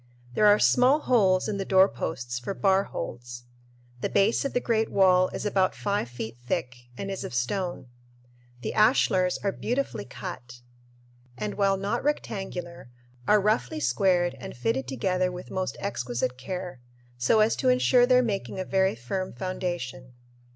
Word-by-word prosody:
There 210 - +4
are 205 0 +7
small 255 +7 +4
holes 195 -9 +3
in 210 - -2
the 195 - -2
doorposts 160 -10 +1
for 160 +11 -5
bar 195 -1 +2
holds. 120 0 -7 0.6
The - - -2
base 200 +3 +2
of 275 - -3
the - - +2
great 225 -2 0
wall 185 -1 +4
is - - -5
about 190 -2 +1
five 200 - -2
feet 115 -1 -7
thick 120 0 -4
and 195 0 -4
is 195 - -4
of - - -6
stone. 175 +7 -2 0.8
The - - -3
ashlars 195 -5 +3
are 200 - +1
beautifully 245 -1 -3
cut 125 -9 -8 0.8
and, 210 - -3
while 195 -1 +2
not 200 +5 -2
rectangular, 190 - -4 0.4
are 210 - +5
roughly 155 - 0
squared 175 +5 +2
and 125 - -8
fitted 125 +2 -1
together 180 +8 0
with 180 0 -9
most 185 0 -3
exquisite 125 -9 -2
care, 175 +1 -6 0.4
so 125 - +3
as 215 +1 +3
to 260 - +2
insure 250 -1 +4
their 250 0 +5
making 200 -4 -3
a 185 - -2
very 190 -4 +1
firm 185 +11 -4
foundation. 170 -9 -5
185 Hz, 160 wpm, -26 LUFS, 130-205 Hz, 0.8 s, are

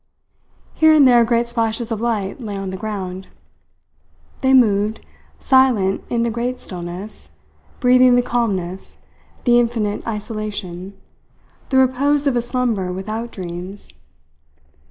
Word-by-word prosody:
Here 315 -1 +5
and 285 -3 +7
there 240 -2 +6
great 235 0 +1
splashes 230 0 -2
of 220 -1 -2
light 225 -1 -2
lay 205 -4 -5
on 195 -1 -4
the - - -5
ground. 190 -2 -5 1.1
They 265 -1 +2
moved, 215 -4 +3 0.3
silent 245 -8 +3
in 235 -1 0
the 235 - 0
great 245 +2 -3
stillness, 180 +3 -8 0.5
breathing 250 -1 +5
the 245 - +3
calmness, 195 -7 -2 0.5
the 240 -1 +5
infinite 230 -4 -1
isolation, 205 -4 -5 0.7
the 265 - +2
repose 275 +3 +2
of 275 -3 +2
a 240 - +2
slumber 230 -6 -1
without 215 +5 -4
dreams. 180 - -7
225 Hz, 125 wpm, -20 LUFS, 195-245 Hz, 1.1 s, and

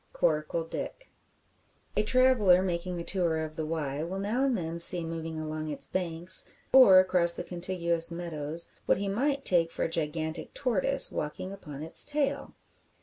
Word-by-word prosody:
CORACLE 160 - -1
DICK. - - -8 0.8
A - - +1
traveller 215 -6 +3
making 180 0 -4
the 170 - -6
tour 170 -4 -1
of 155 0 -11
the 155 -1 -5
Wye 150 -3 -4
will 175 +4 -5
now 215 +7 -2
and 265 -4 0
then 165 -1 -6
see 170 0 +3
moving 165 -1 -6
along 155 0 -6
its 140 -2 -2
banks, 175 +1 0 0.2
or 255 -8 +7
across 180 -2 +6
the - - -6
contiguous 170 -2 0
meadows, 165 -2 -5 0.2
what - - +2
he 200 +1 -4
might 275 +7 -2
take 170 -2 +2
for - - -5
a - - 0
gigantic 160 0 -4
tortoise 265 +2 +3
walking 150 +5 -6
upon 150 -7 -10
its 160 - +6
tail! 290 -1 -2
170 Hz, 165 wpm, -27 LUFS, 160-195 Hz, 0.8 s, or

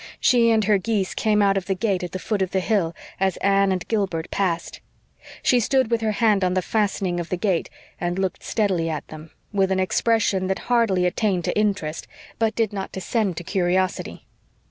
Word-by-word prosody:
She 235 -2 +4
and 220 -1 +3
her 205 0 +3
geese 200 -2 -1
came 210 -2 +2
out 195 -1 +3
of 190 - -3
the 195 - 0
gate 195 -1 0
at 180 - -5
the - - -3
foot 200 +2 -2
of 190 - +1
the 190 - 0
hill 180 -4 0 0.2
as 190 -1 +1
Anne 195 0 +3
and 185 -1 -2
Gilbert 190 -7 -1
passed. 175 -4 -2 0.6
She 250 - +4
stood 255 +1 +1
with 230 -1 +1
her 215 -1 0
hand 210 -3 +2
on 180 0 +1
the 185 - +1
fastening 195 -4 0
of 170 - -5
the 180 - -1
gate, 185 -3 0 0.3
and 175 +1 -2
looked 190 -1 -2
steadily 190 -7 0
at 155 -2 -4
them, 155 +1 -10 0.2
with 195 -1 +2
an 190 - +1
expression 195 -1 +1
that 190 - 0 0.2
hardly 200 -7 +3
attained 180 -1 0
to - - -1
interest, 200 -7 -1 0.3
but 225 -1 +1
did 225 -3 0
not 195 -1 -4
descend 190 -1 -1
to 175 - -4
curiosity. 185 0 -1
195 Hz, 205 wpm, -23 LUFS, 180-215 Hz, 0.6 s, She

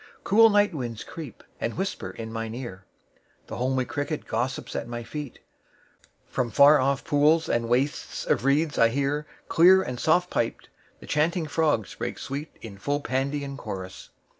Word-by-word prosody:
9Cool 225 +3 +6
night 205 -1 +3
winds 120 -7 -5
creep, 155 -7 -9 0.2
and 115 - -3
whisper 190 +2 -3
in 115 -1 -7
mine 115 0 -4
ear.10The 115 -7 -11
homely 130 +1 0
cricket 145 +3 -3
gossips 125 +4 -3
at - - -3
my 120 0 -5
feet.11From 125 -3 -8
far 145 +5 +7
off 135 +1 +1
pools 150 +3 +3
and 115 -1 0
wastes 130 +4 -1
of - - +1
reeds 145 +3 +2
I 115 - +6
hear,12Clear 150 +7 +2
and 125 -1 -4
soft 175 +5 +2
piped, 115 - -2 0.3
the - - -10
chanting 160 +3 +1
frogs 150 -8 0
break - - -4
sweet13In 135 -8 -7
full 145 +8 -1
Pandean 140 +1 -2
chorus. 95 -6 -7
140 Hz, 145 wpm, -26 LUFS, 120-155 Hz, 0.3 s, far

